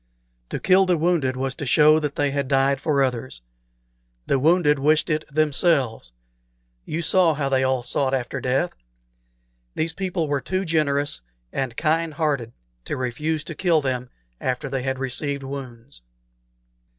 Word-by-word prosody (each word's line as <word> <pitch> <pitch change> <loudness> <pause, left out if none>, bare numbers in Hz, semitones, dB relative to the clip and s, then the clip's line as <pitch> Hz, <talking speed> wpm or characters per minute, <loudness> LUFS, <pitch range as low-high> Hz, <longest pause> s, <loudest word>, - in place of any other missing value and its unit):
To - - -3
kill 190 0 +4
the 180 -2 +3
wounded 155 -6 +1
was 135 0 -2
to - - -7
show 150 +5 +6
that 150 -2 -3
they 145 -1 +1
had 140 -1 -1
died 135 0 +2
for 140 -3 +2
others. 125 - -3 0.8
The 135 - +1
wounded 150 -1 +3
wished 155 +3 +2
it 155 0 0
themselves. 145 - +1 0.7
You 170 +2 -3
saw 170 -1 +3
how 140 -1 -1
they 130 -1 +2
all 130 -1 +1
sought 130 +2 0
after 125 -2 -3
death. 135 +7 0 1.0
These 160 +1 0
people 180 -3 -2
were 145 -1 -1
too 185 +8 -2
generous 145 - 0 0.3
and 130 -4 -3
kind 160 0 0
hearted 140 -7 -1 0.3
to - - -3
refuse 145 +5 -2
to 165 - -7
kill 170 0 +2
them 125 -3 -3 0.3
after 130 +2 -2
they 135 -1 -2
had 130 +1 -2
received 140 +1 -3
wounds." 125 - -8
140 Hz, 155 wpm, -23 LUFS, 130-160 Hz, 1.0 s, show